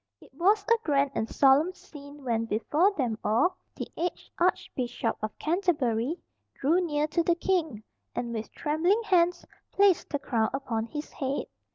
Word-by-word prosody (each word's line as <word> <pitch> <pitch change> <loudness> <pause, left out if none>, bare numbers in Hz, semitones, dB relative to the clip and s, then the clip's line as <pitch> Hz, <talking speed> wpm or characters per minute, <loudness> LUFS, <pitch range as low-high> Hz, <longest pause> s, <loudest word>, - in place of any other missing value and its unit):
It - - -19
was 400 +8 +3
a 465 +1 +3
grand 280 -4 +2
and 220 - -2
solemn 285 +6 +4
scene 285 -3 -13
when, 230 -3 0
before 295 - +2
them 235 -6 -1
all, 240 - +2 0.2
the - - -4
aged 350 +1 -4
Archbishop 250 -9 0
of 215 0 -4
Canterbury 305 - 0 0.4
drew 325 +7 +2
near 300 -3 0
to 340 - +1
the 340 +1 +2
King, 330 - -1 0.3
and 235 -1 -3
with 220 -1 -5
trembling 340 +9 +1
hands 355 -4 +2 0.3
placed 395 -3 +3
the 290 - -1
crown 230 -5 0
upon 230 -5 -2
his 295 +4 -7
head. 270 0 -2
295 Hz, 160 wpm, -28 LUFS, 240-350 Hz, 0.4 s, solemn